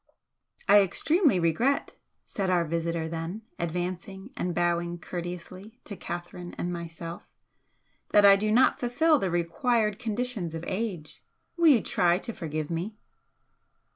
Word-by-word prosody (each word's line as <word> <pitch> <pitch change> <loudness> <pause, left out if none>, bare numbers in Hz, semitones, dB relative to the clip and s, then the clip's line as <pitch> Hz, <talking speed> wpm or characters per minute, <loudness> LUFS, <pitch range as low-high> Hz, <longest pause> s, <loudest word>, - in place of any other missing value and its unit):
"I 205 - +8
extremely 290 - +2
regret," 225 - +1 0.3
said 195 -2 -2
our 175 -2 +2
visitor 165 0 -2
then, 165 +6 -5 0.2
advancing 180 +5 -4
and 175 -1 -2
bowing 175 0 0
courteously 180 +6 -7
to 205 - -8
Catherine 175 0 -7
and 175 0 -2
myself 170 0 -7 0.8
"that 205 -1 +6
I 200 0 +9
do 215 +2 0
not 245 +4 +4
fulfil 290 +6 +3
the 190 - -1
required 210 +6 0
conditions 225 -7 -3
of 165 +1 -6
age! 190 -6 -4 0.3
Will 340 -1 +4
you 265 -8 +6
try 175 0 +2
to 230 +4 -6
forgive 155 -3 -4
me?" 185 +6 -3
180 Hz, 135 wpm, -27 LUFS, 170-220 Hz, 0.8 s, I